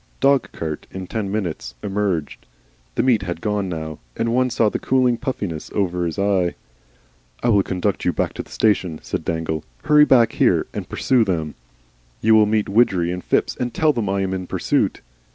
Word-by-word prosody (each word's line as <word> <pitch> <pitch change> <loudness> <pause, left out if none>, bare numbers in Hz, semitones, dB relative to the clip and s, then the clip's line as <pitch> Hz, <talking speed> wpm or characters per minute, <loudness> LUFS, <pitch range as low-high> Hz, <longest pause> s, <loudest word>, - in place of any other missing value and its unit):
Dog 140 +1 +3
cart 80 -2 -5
in 95 0 -6
ten 100 0 -3
minutes. 85 - -3
Emerged. 95 -6 -2 0.5
The - - +1
meat 125 -5 +3
had 90 -3 -4
gone 105 0 -1
now, 80 -2 -5 0.2
and 115 0 0
one 130 +1 +2
saw 115 -2 +2
the - - -1
cooling 130 -2 +2
puffiness 100 - -4
over 90 -3 0
his 80 - -5
eye. 100 -3 +1 0.9
"I 120 - +2
will 100 -3 +5
conduct 95 +1 -2
you 90 - +2
back - - -1
to - - -5
the - - -14
station," 95 -7 +1
said - - -3
Dangle; 80 -2 -2 0.2
"hurry 150 0 +6
back 120 -5 +5
here, - - +2
and - - -5
pursue 125 -3 +2
them. 80 -7 -2 0.7
You 110 +1 +4
will 110 -1 +6
meet 105 0 +1
Widgery 95 -5 +2
and 90 -1 -5
Phipps - - +1
and 125 -1 -4
tell 155 -1 +3
them 115 -6 -2
I 100 0 0
am 95 -1 -1
in 95 -1 -4
pursuit." - - 0
100 Hz, 190 wpm, -21 LUFS, 85-115 Hz, 0.9 s, hurry